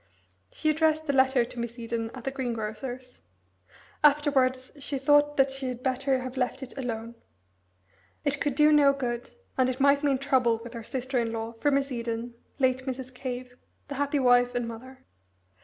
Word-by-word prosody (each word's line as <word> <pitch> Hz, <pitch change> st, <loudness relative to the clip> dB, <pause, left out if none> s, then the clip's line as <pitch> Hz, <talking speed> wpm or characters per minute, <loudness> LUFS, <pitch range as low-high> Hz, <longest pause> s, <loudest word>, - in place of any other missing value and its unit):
She 310 Hz, -, +1 dB
addressed 315 Hz, 0 st, +2 dB
the 280 Hz, -, 0 dB
letter 265 Hz, -2 st, +4 dB
to 240 Hz, -, -9 dB
Miss 235 Hz, 0 st, -4 dB
Eden 230 Hz, -1 st, -3 dB
at 255 Hz, -, -9 dB
the 270 Hz, -, -2 dB
greengrocer's. 250 Hz, 0 st, -5 dB, 0.8 s
Afterwards 275 Hz, -3 st, +3 dB
she 280 Hz, 0 st, -2 dB
thought 290 Hz, +2 st, +3 dB
that 270 Hz, 0 st, +4 dB
she 270 Hz, 0 st, -4 dB
had 250 Hz, 0 st, -5 dB
better 260 Hz, 0 st, +1 dB
have 255 Hz, +1 st, -6 dB
left 260 Hz, +1 st, -1 dB
it 265 Hz, -, -9 dB
alone. 230 Hz, -3 st, -4 dB, 1.1 s
It 285 Hz, 0 st, 0 dB
could 285 Hz, -3 st, 0 dB
do 300 Hz, +1 st, +5 dB
no 285 Hz, -2 st, +6 dB
good, 245 Hz, -3 st, -3 dB, 0.3 s
and 255 Hz, 0 st, +4 dB
it 255 Hz, +1 st, -3 dB
might 280 Hz, +1 st, +4 dB
mean 280 Hz, -2 st, +3 dB
trouble 255 Hz, -4 st, +2 dB
with 235 Hz, 0 st, -9 dB
her 230 Hz, -1 st, -6 dB
sister 255 Hz, +2 st, -2 dB
in 230 Hz, -1 st, -1 dB
law, 225 Hz, 0 st, -4 dB
for 295 Hz, -, +2 dB
Miss 275 Hz, -1 st, +1 dB
Eden, 235 Hz, 0 st, -3 dB, 0.2 s
late 260 Hz, -1 st, +1 dB
Mrs. 260 Hz, 0 st, -5 dB
Cave, 250 Hz, -1 st, -6 dB, 0.3 s
the -, -, -4 dB
happy 285 Hz, +1 st, +1 dB
wife 245 Hz, -2 st, +4 dB
and 245 Hz, -1 st, -1 dB
mother. 255 Hz, +3 st, -10 dB
260 Hz, 180 wpm, -27 LUFS, 245-275 Hz, 1.1 s, no